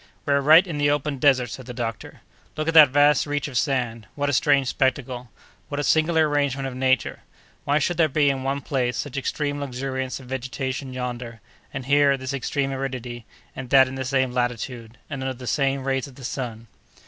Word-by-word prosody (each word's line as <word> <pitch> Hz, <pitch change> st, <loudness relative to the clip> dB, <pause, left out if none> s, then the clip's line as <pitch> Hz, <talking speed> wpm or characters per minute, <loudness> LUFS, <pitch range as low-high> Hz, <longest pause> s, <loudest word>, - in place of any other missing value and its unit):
"We 145 Hz, -, +2 dB
are 140 Hz, -, +3 dB
right 160 Hz, +6 st, +7 dB
in 165 Hz, -5 st, -5 dB
the 145 Hz, 0 st, +3 dB
open 145 Hz, -1 st, -1 dB
desert," 130 Hz, -4 st, +3 dB
said 130 Hz, 0 st, -8 dB
the 125 Hz, -, -7 dB
doctor. 115 Hz, -3 st, -5 dB, 0.4 s
"Look 155 Hz, +1 st, -2 dB
at 165 Hz, -, +1 dB
that 155 Hz, -3 st, +9 dB
vast 145 Hz, +2 st, +4 dB
reach 145 Hz, -1 st, -2 dB
of 140 Hz, -, -9 dB
sand! 120 Hz, -6 st, -1 dB
What 145 Hz, 0 st, 0 dB
a -, -, -3 dB
strange 140 Hz, -1 st, +3 dB
spectacle! 125 Hz, -2 st, -1 dB, 0.4 s
What 145 Hz, -, -3 dB
a -, -, -1 dB
singular 160 Hz, +1 st, +3 dB
arrangement 140 Hz, -2 st, 0 dB
of 130 Hz, -, -6 dB
nature! 130 Hz, -1 st, 0 dB, 0.5 s
Why 145 Hz, +1 st, +2 dB
should 160 Hz, +4 st, 0 dB
there 160 Hz, -2 st, +3 dB
be, 145 Hz, +1 st, +2 dB
in 135 Hz, -1 st, -4 dB
one 135 Hz, +1 st, -2 dB
place, 125 Hz, -3 st, -1 dB
such 145 Hz, -2 st, -4 dB
extreme 145 Hz, +1 st, -2 dB
luxuriance 130 Hz, -1 st, -4 dB
of 130 Hz, -, -12 dB
vegetation 130 Hz, +1 st, -4 dB
yonder, 125 Hz, -2 st, -5 dB, 0.3 s
and 135 Hz, -3 st, -6 dB
here, 140 Hz, 0 st, +4 dB
this 130 Hz, +1 st, -5 dB
extreme 140 Hz, +1 st, -1 dB
aridity, 125 Hz, -3 st, -5 dB, 0.3 s
and 130 Hz, -2 st, -7 dB
that 135 Hz, 0 st, +6 dB
in 130 Hz, -, -7 dB
the 135 Hz, 0 st, -3 dB
same 130 Hz, -1 st, 0 dB
latitude, 120 Hz, -1 st, -3 dB
and 140 Hz, -3 st, -6 dB
under 130 Hz, 0 st, -3 dB
the 125 Hz, +1 st, -10 dB
same 135 Hz, +1 st, 0 dB
rays 135 Hz, 0 st, -1 dB
of 135 Hz, -, -14 dB
the 130 Hz, -, -10 dB
sun?" 120 Hz, -3 st, -5 dB
135 Hz, 205 wpm, -24 LUFS, 125-145 Hz, 0.5 s, that